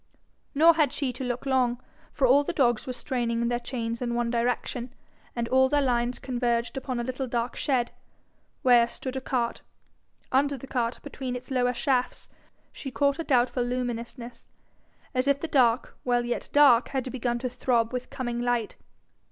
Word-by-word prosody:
Nor 325 +4 +7
had 305 -5 +2
she 265 -4 -2
to 255 - -6
look 245 +1 -3
long, 250 -3 +1 0.3
for 275 - +1
all 270 +3 +5
the 345 - -3
dogs 240 -6 +2
were 255 - -2
straining 235 -2 -1
their 240 0 0
chains 235 -2 -4
in 240 -1 -1
one 240 -1 0
direction, 240 +1 -1 0.4
and 235 -1 -1
all 260 0 +4
their 290 +1 +3
lines 245 -1 0
converged 240 -1 -1
upon 260 -2 -3
a - - -1
little 255 +2 -3
dark 240 0 -2
shed, 250 -4 0 0.7
where 240 -2 +6
stood 260 +2 -7
a 265 - -2
cart: 245 -3 -1 0.7
under 280 +1 +2
the 265 - -9
cart, 240 -3 -2
between 255 -2 -5
its 250 +2 -8
lower 250 -1 +2
shafts, 255 -2 -1 0.4
she 270 - -7
caught 280 +3 +1
a - - -1
doubtful 250 -3 +2
luminousness, 240 -1 -4 0.7
as 255 +1 0
if 280 0 +3
the 330 - -3
dark 245 -5 +2
while 245 -1 +1
yet 240 - -3
dark 275 -5 +6
had 260 -2 -3
begun 240 -2 -1
to 255 +2 -3
throb 240 -1 0
with 250 0 -4
coming 240 -2 -3
light. 240 -3 -1
250 Hz, 175 wpm, -27 LUFS, 240-265 Hz, 0.7 s, Nor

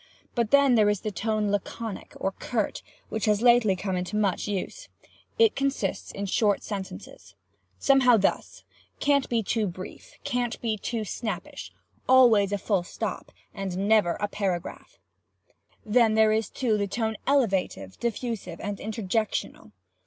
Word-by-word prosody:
But 235 -3 0
then 280 -1 +5
there 215 -3 +5
is 205 -2 0
the 215 - -3
tone 210 +1 -1
laconic, 205 +1 -4
or 195 - 0
curt, 215 +2 -3 0.3
which 220 -2 -2
has 210 +1 +2
lately 240 -5 +5
come 185 0 -2 0.2
much 205 -3 0
into - - -2
use. - - -9 0.5
It 455 -2 +4
consists 275 -8 -2
in 200 - -4
short 205 +1 +1
sentences. 185 - -8 0.4
Somehow 250 - +5
thus: 200 - -1 0.4
Can't 280 -1 +2
be 230 -2 +1
too 215 +1 0
brief. 185 +1 -9
Can't 245 -1 -2
be 225 -2 -1
too 220 +1 -3
snappish. 215 +2 -5 0.4
Always 230 -6 +6
a 205 - +1
full 200 -1 0
stop. 175 - -5 0.2
And 195 -1 -3
never 210 -6 +4
a 205 - 0
paragraph. 190 -4 -4 0.9
"Then 220 0 +3
there 220 0 +5
is 220 0 0
the 215 -6 0
tone 220 +2 -2
elevated, 195 - 0
diffusive, 230 -7 -3
and 205 0 -4
interjectional. 215 - -3
215 Hz, 145 wpm, -26 LUFS, 195-235 Hz, 0.9 s, Always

